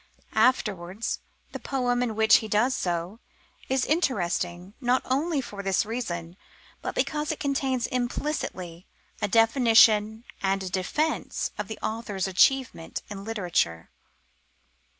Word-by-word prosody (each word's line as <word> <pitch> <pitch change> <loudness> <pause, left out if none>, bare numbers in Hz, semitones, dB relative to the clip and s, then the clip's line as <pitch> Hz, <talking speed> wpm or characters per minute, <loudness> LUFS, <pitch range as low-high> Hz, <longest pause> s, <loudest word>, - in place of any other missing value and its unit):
Afterwards, 205 -5 +1 0.3
the - - -6
poem 245 -2 0
in 235 -3 -1
which 220 0 +6
he 220 - -4
does 220 +5 +2
so, 175 +4 -2 0.5
is 265 -1 +1
interesting, 180 - -1
not 250 +1 +2
only 285 +3 0
for 205 -5 -7
this 195 0 +1
reason, 180 -7 -4 0.4
but - - -4
because 300 +4 0
it 315 - -5
contains 270 -3 0
implicitly 240 - -3 0.3
a - - +1
definition 225 -1 +5 0.2
and 195 0 0
a 185 - -5
defence 295 - -1
of 210 - -4
the 220 - -6
author's 210 -4 -2
achievement 225 -1 +1
in 195 -1 -6
literature. 175 - -1
220 Hz, 125 wpm, -26 LUFS, 190-255 Hz, 0.5 s, which